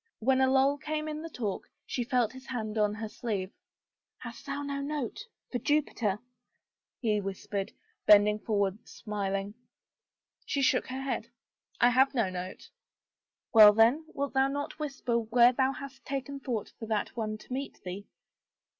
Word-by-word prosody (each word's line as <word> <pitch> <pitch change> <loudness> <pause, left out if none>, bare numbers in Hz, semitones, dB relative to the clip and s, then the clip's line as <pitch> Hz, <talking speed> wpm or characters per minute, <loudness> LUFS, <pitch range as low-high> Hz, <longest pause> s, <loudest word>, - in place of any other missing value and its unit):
When 260 +3 +2
a 260 - +4
lull 270 +2 +3
came 305 +2 -3
in 305 0 -4
the 330 - -6
talk 215 -10 -4 0.2
she 245 - -2
felt 245 -3 +1
his 260 +1 -12
hand 220 -4 -3
on 210 -1 +2
her 220 0 -4
sleeve. 210 -4 -3 0.4
" - - -63
Hast 235 +1 -9
thou 285 +1 -3
no 280 0 -3
note 290 - -4
— - - -50
for 245 - -1
Jupiter? 245 -8 +1 0.4
" - - -63
he 210 -2 +2
whispered, 195 0 -4 0.4
bending 210 0 +7
forward 205 0 -1
smiling. 200 -1 -3 0.9
She 280 - -1
shook - - +3
her 260 +1 -4
head, 250 -4 -2 0.3
" - - -64
I 245 - +6
have 265 +3 +4
no 220 -7 +1
note." 185 +1 -6 0.4
" - - -62
Well 215 -2 +10
then, 235 +9 +4
wilt 280 -1 -3
thou 265 0 +4
not 285 +2 -4
whisper 270 -5 -1
where 235 +2 +5
thou 260 +1 +2
hast 270 -1 -9
taken 275 +1 -4
thought 240 -6 -4
for 225 - -6
that 215 -2 -1
one 215 -2 -2
to 230 - -9
meet 270 +2 -4
thee? 185 +3 -6
240 Hz, 175 wpm, -30 LUFS, 210-275 Hz, 0.9 s, Well